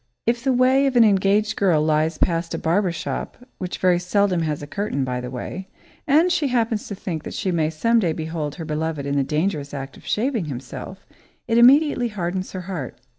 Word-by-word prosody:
If 235 Hz, +1 st, 0 dB
the 270 Hz, -, +2 dB
way 260 Hz, +2 st, +4 dB
of 265 Hz, -, -1 dB
an 240 Hz, -, +7 dB
engaged 205 Hz, 0 st, +3 dB
girl 180 Hz, -6 st, +3 dB
lies 155 Hz, +1 st, +1 dB
past 165 Hz, -1 st, 0 dB
a -, -, -2 dB
barber 180 Hz, +3 st, +1 dB
shop, 165 Hz, -, -5 dB, 0.2 s
which 185 Hz, -1 st, -4 dB
very 180 Hz, -1 st, +3 dB
seldom 185 Hz, 0 st, +1 dB
has 150 Hz, -2 st, -2 dB
a -, -, -4 dB
curtain, 150 Hz, -3 st, -2 dB
by 125 Hz, -1 st, -2 dB
the 125 Hz, -, -6 dB
way, 180 Hz, +9 st, -6 dB, 0.4 s
and 315 Hz, +5 st, +4 dB
she 330 Hz, -5 st, +1 dB
happens 230 Hz, -4 st, 0 dB
to 200 Hz, -, -5 dB
think 170 Hz, -4 st, -4 dB
that -, -, -7 dB
she 190 Hz, -, -1 dB
may 160 Hz, -3 st, +1 dB
some 230 Hz, +9 st, +2 dB
day 175 Hz, -7 st, +1 dB
behold 155 Hz, -2 st, -4 dB
her 165 Hz, -, -6 dB
beloved 155 Hz, -1 st, -3 dB
in 140 Hz, 0 st, -1 dB
the 140 Hz, -, +2 dB
dangerous 150 Hz, -1 st, -2 dB
act 135 Hz, -1 st, -7 dB
of -, -, -16 dB
shaving 230 Hz, -, 0 dB
himself, 140 Hz, +7 st, -8 dB, 0.4 s
it 230 Hz, 0 st, +3 dB
immediately 265 Hz, 0 st, +5 dB
hardens 185 Hz, -3 st, -4 dB
her 185 Hz, -, -4 dB
heart. 175 Hz, -8 st, -6 dB
180 Hz, 210 wpm, -22 LUFS, 155-225 Hz, 0.4 s, an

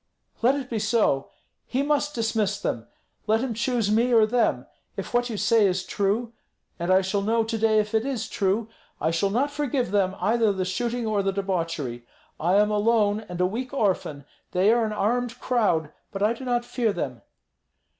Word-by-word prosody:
"Let 250 Hz, +4 st, +4 dB
it 275 Hz, -3 st, -4 dB
be 230 Hz, -4 st, -2 dB
so. 210 Hz, -10 st, +1 dB, 0.4 s
He 265 Hz, +2 st, 0 dB
must 295 Hz, 0 st, 0 dB
dismiss 220 Hz, -3 st, 0 dB
them. 115 Hz, -, -3 dB, 0.4 s
Let 220 Hz, +1 st, +3 dB
him 255 Hz, -3 st, -2 dB
choose 230 Hz, -2 st, 0 dB
me 235 Hz, +3 st, +3 dB
or 225 Hz, -2 st, +6 dB
them. 235 Hz, +2 st, +1 dB, 0.3 s
If -, -, -5 dB
what 245 Hz, 0 st, +1 dB
you 220 Hz, -, -4 dB
say 220 Hz, 0 st, +4 dB
is 185 Hz, 0 st, -1 dB
true, 215 Hz, +4 st, -1 dB, 0.5 s
and 170 Hz, +2 st, -1 dB
I 190 Hz, +1 st, +5 dB
shall 195 Hz, +1 st, -1 dB
know 225 Hz, +3 st, +1 dB
to 225 Hz, +1 st, -3 dB
day 220 Hz, 0 st, +3 dB
if 210 Hz, 0 st, 0 dB
it 220 Hz, 0 st, +2 dB
is 260 Hz, -4 st, -3 dB
true, 200 Hz, +3 st, 0 dB, 0.3 s
I 160 Hz, -, +1 dB
shall 165 Hz, +4 st, +1 dB
not 260 Hz, +8 st, 0 dB
forgive 280 Hz, -6 st, -1 dB
them 195 Hz, -2 st, +1 dB
either 225 Hz, -1 st, +2 dB
the 190 Hz, -2 st, -2 dB
shooting 235 Hz, +5 st, -2 dB
or 215 Hz, -2 st, +1 dB
the 195 Hz, 0 st, 0 dB
debauchery. 165 Hz, -11 st, -3 dB, 0.4 s
I 175 Hz, +4 st, +2 dB
am 210 Hz, +1 st, +4 dB
alone 210 Hz, 0 st, +2 dB
and 180 Hz, 0 st, -6 dB
a 180 Hz, -, +3 dB
weak 250 Hz, +8 st, -4 dB
orphan, 180 Hz, -, -1 dB, 0.3 s
they 190 Hz, +4 st, +4 dB
are 235 Hz, -1 st, +2 dB
an 215 Hz, -, -3 dB
armed 240 Hz, +3 st, -1 dB
crowd; 195 Hz, -11 st, +1 dB, 0.2 s
but 195 Hz, 0 st, -3 dB
I 215 Hz, +2 st, +3 dB
do 260 Hz, +3 st, -9 dB
not 240 Hz, -1 st, 0 dB
fear 235 Hz, -3 st, 0 dB
them." 130 Hz, -, -4 dB
215 Hz, 195 wpm, -25 LUFS, 195-240 Hz, 0.5 s, or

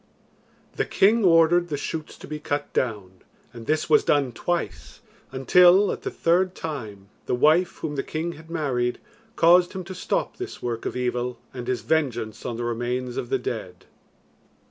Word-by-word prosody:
The -, -, +1 dB
king 220 Hz, +3 st, +3 dB
ordered 170 Hz, 0 st, +5 dB
the 145 Hz, -, -2 dB
shoots 155 Hz, +2 st, -5 dB
to -, -, -11 dB
be 150 Hz, 0 st, -5 dB
cut 145 Hz, -1 st, -3 dB
down, 100 Hz, -7 st, -2 dB, 0.3 s
and 115 Hz, -2 st, -10 dB
this 155 Hz, +1 st, +1 dB
was 155 Hz, -, +5 dB
done 140 Hz, -3 st, +2 dB
twice, 100 Hz, -, -4 dB, 0.3 s
until, 180 Hz, +9 st, +5 dB
at -, -, -5 dB
the -, -, -3 dB
third 180 Hz, +2 st, +1 dB
time, 110 Hz, -11 st, -7 dB, 0.2 s
the -, -, +1 dB
wife 160 Hz, +7 st, +3 dB
whom 150 Hz, -2 st, -3 dB
the 135 Hz, -, 0 dB
king 160 Hz, +4 st, -3 dB
had 160 Hz, 0 st, -13 dB
married 130 Hz, -7 st, -1 dB, 0.4 s
caused 175 Hz, +2 st, +5 dB
him 190 Hz, -1 st, -5 dB
to 180 Hz, +2 st, -8 dB
stop 345 Hz, -, -2 dB
this 375 Hz, +1 st, -6 dB
work 120 Hz, -2 st, -3 dB
of -, -, -4 dB
evil 125 Hz, 0 st, -2 dB, 0.2 s
and 125 Hz, -2 st, -7 dB
his 125 Hz, -2 st, -1 dB
vengeance 120 Hz, -5 st, -1 dB
on 120 Hz, -2 st, -4 dB
the 120 Hz, -, -3 dB
remains 120 Hz, +1 st, -2 dB
of -, -, -4 dB
the 400 Hz, -, +2 dB
dead. 405 Hz, +2 st, -6 dB
150 Hz, 175 wpm, -24 LUFS, 120-170 Hz, 0.4 s, ordered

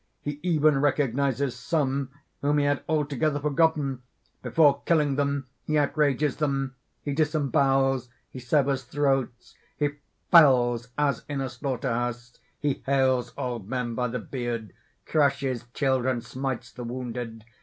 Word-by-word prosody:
He 145 Hz, 0 st, -5 dB
even 155 Hz, -5 st, +3 dB
recognizes 140 Hz, -1 st, +1 dB
some 135 Hz, +1 st, -1 dB, 0.3 s
whom 145 Hz, +1 st, +2 dB
he 145 Hz, -, +2 dB
had 145 Hz, -1 st, +1 dB
altogether 150 Hz, -1 st, 0 dB
forgotten; 145 Hz, -3 st, +1 dB, 0.4 s
before 145 Hz, -3 st, +3 dB
killing 150 Hz, -5 st, +2 dB
them 140 Hz, -1 st, 0 dB, 0.2 s
he 155 Hz, -, 0 dB
outrages 145 Hz, -1 st, +1 dB
them. 135 Hz, -3 st, -1 dB, 0.3 s
He 145 Hz, -, -2 dB
disembowels 135 Hz, -4 st, +2 dB, 0.2 s
he 130 Hz, -, -9 dB
severs 135 Hz, +1 st, +1 dB
throats 135 Hz, -2 st, -1 dB, 0.2 s
he 145 Hz, -1 st, +1 dB, 0.4 s
fells 125 Hz, -7 st, +6 dB
as 145 Hz, -5 st, +1 dB
in 145 Hz, -1 st, -2 dB
a 135 Hz, -1 st, -2 dB
slaughter 130 Hz, 0 st, -2 dB
house 120 Hz, +1 st, -4 dB, 0.2 s
he 145 Hz, -2 st, -1 dB
hales 130 Hz, -2 st, +2 dB
old 120 Hz, -5 st, -4 dB
men 125 Hz, -2 st, -2 dB
by 125 Hz, +1 st, 0 dB
the 125 Hz, +2 st, -3 dB
beard, 120 Hz, -3 st, -4 dB, 0.3 s
crushes 135 Hz, -5 st, +1 dB
children, 130 Hz, -3 st, +1 dB
smites 130 Hz, -1 st, -4 dB
the 125 Hz, -, -8 dB
wounded. 120 Hz, -2 st, -5 dB
135 Hz, 135 wpm, -26 LUFS, 125-145 Hz, 0.4 s, fells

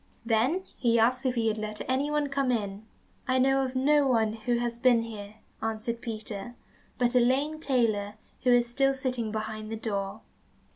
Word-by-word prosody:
Then 245 Hz, +11 st, +2 dB
he 235 Hz, -2 st, +2 dB
asked 255 Hz, +4 st, +2 dB
if 255 Hz, -, 0 dB
he 230 Hz, -1 st, +1 dB
had 220 Hz, 0 st, 0 dB
let 215 Hz, 0 st, -5 dB
anyone 290 Hz, +3 st, +1 dB
come 275 Hz, -2 st, +1 dB
in. 210 Hz, -2 st, -3 dB, 0.4 s
"I 260 Hz, 0 st, +2 dB
know 270 Hz, +1 st, +3 dB
of 260 Hz, 0 st, -4 dB
no 285 Hz, +2 st, +4 dB
one 225 Hz, -4 st, +2 dB
who 230 Hz, +2 st, -1 dB
has 235 Hz, 0 st, -2 dB
been 240 Hz, -2 st, +4 dB
here," 210 Hz, -2 st, -8 dB, 0.3 s
answered 225 Hz, +1 st, -3 dB
Peter, 215 Hz, 0 st, -6 dB, 0.4 s
"but 245 Hz, -1 st, +2 dB
a 250 Hz, -, +5 dB
lame 275 Hz, +6 st, +1 dB
tailor, 220 Hz, -8 st, 0 dB, 0.3 s
who 250 Hz, -, +3 dB
is 240 Hz, 0 st, +4 dB
still 270 Hz, +3 st, +2 dB
sitting 255 Hz, -4 st, -2 dB
behind 215 Hz, 0 st, -4 dB
the 225 Hz, -, -3 dB
door." 200 Hz, -1 st, -3 dB
235 Hz, 180 wpm, -28 LUFS, 220-260 Hz, 0.4 s, a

